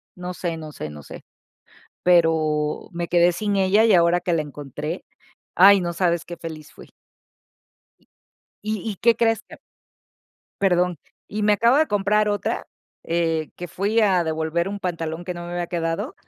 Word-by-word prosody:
No 180 0 -6
sé, 170 -2 -4
no 155 -1 -8
sé, 75 - -6
no 75 -1 -10
sé. - - -11 0.8
Pero 160 -3 +2
me 170 0 -3
quedé 175 +1 +4
sin 205 +3 -1
ella 195 +3 +4
y 220 - +4
ahora 170 0 +4
que 180 0 -2
la 165 - +1
encontré, 150 +3 -6 0.5
ay, 195 +1 +7
no 175 -1 -2
sabes 170 -1 0
qué 175 - -8
feliz 155 -2 -9
fui. - - -14 1.8
Y 215 0 -1
y 210 - -3
qué 235 +4 +3
crees, 225 -1 +1
ca - - -14 1.0
Perdón, 180 -3 +2 0.3
y 210 0 -3
me 210 0 +4
acabo 235 +5 +3
de 310 +1 +4
comprar 210 +1 +1
otra, 205 0 -2 0.4
eh, 165 -2 -1
que 175 - -7
fui 205 +7 0
a 190 -5 +3
devolver 160 +2 -1
un 200 +1 -5
pantalón 170 -2 -4
que 180 - -4
no 175 0 -7
me 175 - -7
había 175 0 -2
quedado. 165 -1 -3
175 Hz, 170 wpm, -23 LUFS, 165-200 Hz, 1.8 s, ay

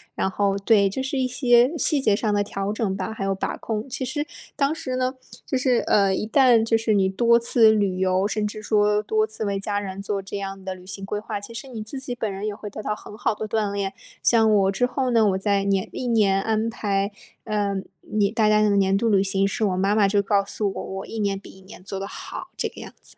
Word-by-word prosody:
然 190 - 0
后 200 0 +1
对， 200 -1 +3
就 265 +7 -3
是 265 +1 -2
一 260 - +1
些 250 +3 +3
细 300 -1 +3
节 215 -6 +3
上 210 0 0
的 205 - +2
调 200 0 -3
整 215 -3 -1
吧， 195 +3 -4
还 200 -3 -4
有 195 0 0
把 190 - -3
控。 215 -1 -3
其 260 0 -3
实 295 +4 -2 0.3
当 280 +1 +1
时 260 -5 -4
呢， 255 +1 -1 0.3
就 265 - -1
是， 255 -1 +2
呃， 195 -2 +3
一 - - -2
旦 235 0 +5
就 225 0 +2
是 225 -1 +1
你 195 -2 +3
多 235 +4 +4
次 235 -1 +4
旅 200 -4 +1
游， 185 +1 +2
甚 210 0 -1
至 215 +1 -7
说 210 0 +2
多 215 +1 +1
次 220 0 -6
为 200 -1 -1
家 205 +1 -2
人 195 -1 -4
做 200 0 -2
这 195 +1 -6
样 195 -1 -6
的 190 - -4
旅 185 0 -13
行 195 +1 -6
规 205 +1 -3
划， 210 -1 -5
其 215 +3 -9
实 240 +4 -7
你 230 -4 -6
自 265 +5 -7
己 250 -2 -5
本 220 -4 -3
人 195 +2 -4
也 210 - -3
会 210 0 -8
得 215 - -7
到 210 - -2
很 210 - -12
好 220 - 0
的 220 - -4
锻 215 -1 -1
炼。 200 -1 -2 0.3
像 225 -2 +4
我 195 -1 +3
之 245 +6 +1
后 255 +1 -1
呢， 230 -2 +4
我 190 - 0
在 200 0 +1
年 195 -1 0
历 250 - -4
年 205 -4 +3
安 220 +2 0
排， 200 -2 -1 0.3
呃， 205 -2 -1 0.3
你 205 -1 0
大 220 -1 +2
家 215 0 +4
的 205 -1 +3
年 195 0 +3
度 225 +3 +1
旅 200 -3 +4
行 195 0 +1
时， 205 +3 0
我 190 -3 0
妈 195 +2 +1
妈 210 -2 +4
就 200 +1 +2
告 200 0 +1
诉 200 0 -2
我， - - -5 0.2
我 - - -7
一 225 - -6
年 200 -2 0
比 195 - -12
一 190 - -17
年 190 -1 -13
做 195 0 -5
得 195 - -4
好， - - -8
这 - - -1
个 - - -13
样 - - -9
子。 - - -17
210 Hz, 280 characters per minute, -24 LUFS, 195-225 Hz, 0.3 s, 旦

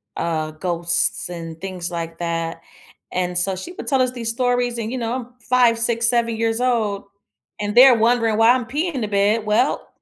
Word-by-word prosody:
uh, 155 -2 -2
ghosts 170 +2 -1
and 165 -2 -7
things 180 -2 -5
like 165 -1 -5
that. 165 -1 -3 0.5
And 180 -1 -2
so, 190 +1 0
she 190 - -8
would - - -9
tell 270 -3 +2
us 255 -1 +1
these 235 -3 -4
stories, 245 0 0
and, 225 0 -4
you 260 - -3
know 230 0 -2
I'm 250 -2 -5
5, 240 0 +3
6, 230 0 +1
7 235 -2 +1
years 225 +1 0
old, 220 -6 0 0.5
and 205 +1 -3
they're 250 0 +8
wondering 230 -1 +2
why 225 +1 +6
I'm 250 -2 -1
peeing 300 +6 -2
in 255 - -2
the 215 - -1
bed. 205 +2 +1
Well, 225 +6 +1
225 Hz, 200 wpm, -21 LUFS, 180-245 Hz, 0.5 s, they're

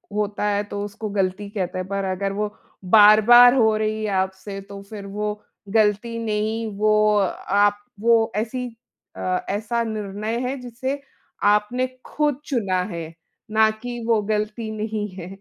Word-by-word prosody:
होता 210 -1 -1
है 205 0 +1
तो 205 0 -5
उसको 210 +1 -6
गलती 200 0 -1
कहते 185 -4 -3
हैं, 185 0 -3
पर 200 0 -2
अगर 195 +1 -2
वो 210 +1 -3 0.3
बार-बार 220 +5 +8
हो 220 -4 +4
रही 215 0 -1
है 210 - -1
आपसे 190 +1 -4
तो 200 0 -8
फिर 205 -2 -8
वो 210 +1 -4 0.3
गलती 215 +2 +1
नहीं 220 +1 -1
वो 215 0 +3
अ, 195 -3 -1
आप 205 +1 +4 0.2
वो 230 0 +3
ऐसी 235 +4 -2 0.5
अ, 185 0 -2
ऐसा 225 +4 -1
निर्णय 215 +1 -3
है 265 - -2
जिसे 260 +3 -4 0.4
आपने 210 +5 +2 0.2
खुद 295 -3 0
चुना 195 -9 0
है, 165 -1 -6 0.4
ना 220 0 +5
कि 240 +2 -7
वो 225 -2 +3
गलती 215 +1 -2
नहीं 215 -1 -2
है। 180 -2 -7
210 Hz, 155 wpm, -23 LUFS, 200-225 Hz, 0.5 s, बार-बार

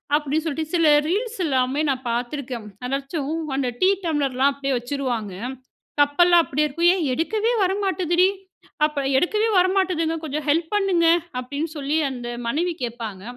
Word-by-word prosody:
அப்படின்னு 300 +1 -1
சொல்லிட்டு, 315 0 -3
சில 335 -1 +3 0.2
ரீல்ஸ் 445 +7 -1
எல்லாமே 265 0 +1
நான் 260 -1 -2
பார்த்துருக்கேன். 245 -1 -4 0.2
அதாச்சும் 275 +3 -3 0.2
அந்த 270 -2 0
டீ 370 - +5 0.2
டம்ளர்லாம் 280 -4 +1
அப்படியே 275 0 -3
வச்சுருவாங்க. 245 -5 -3 0.7
கப்பெல்லாம் 340 +4 +5
அப்படியே 300 +2 0
இருக்கும். 335 +5 +2
"ஏன் 365 - -1
எடுக்கவே 430 - 0
வரமாட்டுதுடி. 370 -2 +2 0.6
அப்ப 300 -2 -2 0.2
எடுக்கவே 425 +9 +1
வர 365 0 +5
மாட்டுதுங்க, 340 -4 +1
கொஞ்சம் 300 -1 -4
ஹெல்ப் 320 +2 +1
பண்ணுங்க." 385 -4 +2 0.3
அப்படின்னு 285 +6 -4
சொல்லி 290 +2 -1
அந்த 245 -2 -6 0.2
மனைவி 340 +8 0
கேப்பாங்க. 225 -5 -5
300 Hz, 140 wpm, -23 LUFS, 270-345 Hz, 0.7 s, டீ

